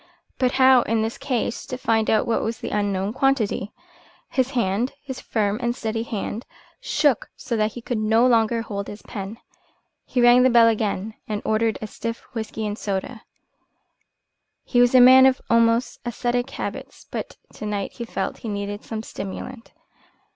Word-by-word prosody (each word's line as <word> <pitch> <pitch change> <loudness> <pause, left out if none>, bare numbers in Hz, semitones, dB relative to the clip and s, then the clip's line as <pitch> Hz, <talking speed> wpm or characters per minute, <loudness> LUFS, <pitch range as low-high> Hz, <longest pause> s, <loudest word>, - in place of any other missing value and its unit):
But 255 -1 +2
how, 260 -1 +6
in 225 -1 0
this 225 +1 -4
case, 240 -3 -2
to 255 -2 -4
find 225 -3 +1
out 220 - +3
what 230 - 0
was 225 0 -2
the - - -6
unknown 200 -1 -1
quantity? 255 -7 0 0.6
His 260 -1 +1
hand, 225 +3 0
his 265 -3 -7
firm 210 -1 -1
and 240 0 0
steady 225 -1 -3
hand, 225 0 -4 0.4
shook 290 -7 +1
so 235 - -4
that 215 -1 0
he 240 - -8
could 240 -2 -2
no 220 +3 +3
longer 230 -1 +3
hold 200 -3 -5
his 205 - -9
pen. 205 0 -7 0.7
He 250 - -2
rang 240 +1 +7
the 260 - +5
bell 235 -2 +6
again 215 -1 -1
and 210 -1 -2
ordered 220 0 +1
a - - -2
stiff 230 +2 -5
whisky 220 -1 -4
and 210 +1 -4
soda. 205 +3 -3 1.4
He 245 - +2
was 245 +1 +4
a - - +9
man 260 +1 +9
of 260 -1 +2
almost 230 +1 +3
ascetic 245 +2 -1
habits, - - -7
but - - -5 0.2
to 215 - -6
night 205 -2 -3
he 235 - -7
felt - - -3
that - - -20
he 225 - -5
needed 205 0 -4
some 220 -1 -5
stimulant. 230 +5 -7
230 Hz, 175 wpm, -23 LUFS, 215-245 Hz, 1.4 s, a